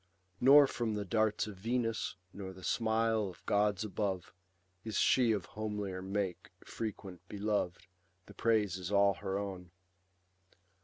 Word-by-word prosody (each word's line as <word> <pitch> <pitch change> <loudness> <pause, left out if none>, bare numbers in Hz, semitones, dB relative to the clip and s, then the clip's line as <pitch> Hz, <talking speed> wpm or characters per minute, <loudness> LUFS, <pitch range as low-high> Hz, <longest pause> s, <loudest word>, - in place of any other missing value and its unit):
Nor 140 +3 +8
from 115 -5 -2
the 105 -1 -3
darts 110 +1 +1
of 105 -3 -8
Venus, 115 +1 -1 0.2
nor 95 -1 -7
the 95 0 -13
smile 110 -1 +1
Of 90 - -14
gods 105 0 +2
above, 100 -3 -3 0.5
is 110 -1 -3
she 125 -3 +4
of 100 -4 -1
homelier 105 -3 -4
make 95 -1 -3 0.2
Frequent 100 -5 -6
belov'd; 100 -3 -1 0.4
the 100 - -13
praise 105 -3 +1
is 90 +1 -5
all 100 -1 +5
her 95 +1 -3
own. 95 -3 -5
105 Hz, 140 wpm, -33 LUFS, 95-110 Hz, 0.5 s, Nor